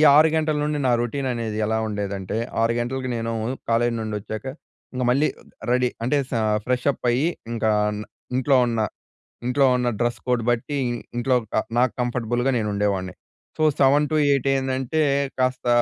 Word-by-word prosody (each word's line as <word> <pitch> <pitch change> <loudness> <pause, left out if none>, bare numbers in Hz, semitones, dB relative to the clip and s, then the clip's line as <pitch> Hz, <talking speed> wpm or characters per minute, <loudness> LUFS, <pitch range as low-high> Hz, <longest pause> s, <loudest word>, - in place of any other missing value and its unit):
6 155 +2 +7
గంటల 155 -1 +1
నుండి 150 0 0
నా 125 - +4
రొటీన్ 135 +3 -2
అనేది 115 -3 -3
ఎలా 110 +1 0
ఉండేదంటే 100 -1 -3 0.2
6 115 +1 +2
గంటలకి 130 +2 -2
నేను 115 0 -2 0.4
కాలేజ్ 115 +1 +2
నుండి 110 -1 -3
ఒచ్చాక 110 +3 -7 0.5
ఇంగ 125 - -2
మళ్ళీ 140 +5 +3 0.4
రెడీ 125 0 +3
అంటే 135 +5 +2
స - - -20 0.3
ఫ్రెష్‌అప్ 125 +1 0
అయ్యి 130 +7 +2 0.2
ఇంకా 110 -1 0 0.7
ఇంట్లో 135 +1 +3
ఉన్న, 115 -1 -1 0.7
ఇంట్లో 135 +2 +3
ఉన్న 125 -1 0
డ్రెస్ 120 0 0
కోడ్ 125 -2 +1
బట్టి 120 +5 -1 0.4
ఇంట్లో 125 +1 +2 0.2
క - - -8 0.2
నాకు 125 +1 +3
కంఫర్టబుల్‍గా 120 +1 0
నేను 105 -2 -1
ఉండేవాణ్ణి. 95 -2 -1 0.4
సో 155 - 0 0.2
7-8 145 0 +3
ఏందంటే 130 +3 0 0.4
కాస్త 130 -1 0
125 Hz, 150 wpm, -23 LUFS, 115-135 Hz, 0.7 s, 6